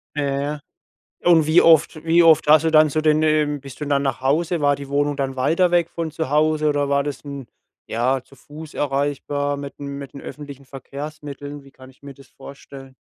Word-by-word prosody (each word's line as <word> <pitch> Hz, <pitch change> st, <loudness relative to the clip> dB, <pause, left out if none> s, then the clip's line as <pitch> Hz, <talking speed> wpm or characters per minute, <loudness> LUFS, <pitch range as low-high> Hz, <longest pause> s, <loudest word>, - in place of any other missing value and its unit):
ja, 140 Hz, -1 st, -1 dB
ja. 145 Hz, +1 st, -3 dB, 0.7 s
Und 165 Hz, -3 st, +5 dB
wie 160 Hz, +2 st, +5 dB
oft 160 Hz, -1 st, +3 dB
wie 165 Hz, +1 st, +4 dB
oft 165 Hz, -3 st, +5 dB
hast 155 Hz, +1 st, +5 dB
du 160 Hz, -, +2 dB
dann 155 Hz, -1 st, +5 dB
zu 155 Hz, -, 0 dB
den, 155 Hz, 0 st, +2 dB
ähm 150 Hz, -2 st, +1 dB
bist 135 Hz, 0 st, -12 dB
du 150 Hz, -, -2 dB
dann 140 Hz, -1 st, +1 dB
nach 135 Hz, -3 st, -2 dB
Hause? 160 Hz, +5 st, 0 dB
War 145 Hz, -1 st, +2 dB
die 140 Hz, -1 st, -9 dB
Wohnung 145 Hz, +1 st, 0 dB
dann 135 Hz, -1 st, -3 dB
weiter 165 Hz, +7 st, +2 dB
weg 170 Hz, -1 st, +1 dB
von 165 Hz, -2 st, -4 dB
zu 160 Hz, -2 st, -4 dB
Hause 155 Hz, +1 st, +2 dB
oder 145 Hz, -1 st, 0 dB
war 140 Hz, 0 st, +2 dB
das 145 Hz, 0 st, -6 dB
'n 140 Hz, -3 st, -8 dB, 0.4 s
ja, 125 Hz, +3 st, 0 dB
zu 135 Hz, -, -20 dB
Fuß 150 Hz, +4 st, -12 dB
erreichbar 145 Hz, 0 st, -2 dB
mit 140 Hz, 0 st, -8 dB
dem 140 Hz, -1 st, -6 dB
mit 140 Hz, -2 st, -9 dB
den 140 Hz, -, -8 dB
öffentlichen 140 Hz, -2 st, -10 dB
Verkehrsmitteln? 145 Hz, +1 st, -9 dB
Wie 135 Hz, -, -16 dB
kann 130 Hz, 0 st, -15 dB
ich 130 Hz, -, -26 dB
mir 140 Hz, -1 st, -10 dB
das 135 Hz, 0 st, -18 dB
vorstellen? 135 Hz, -1 st, -13 dB
145 Hz, 215 wpm, -21 LUFS, 140-155 Hz, 0.7 s, Und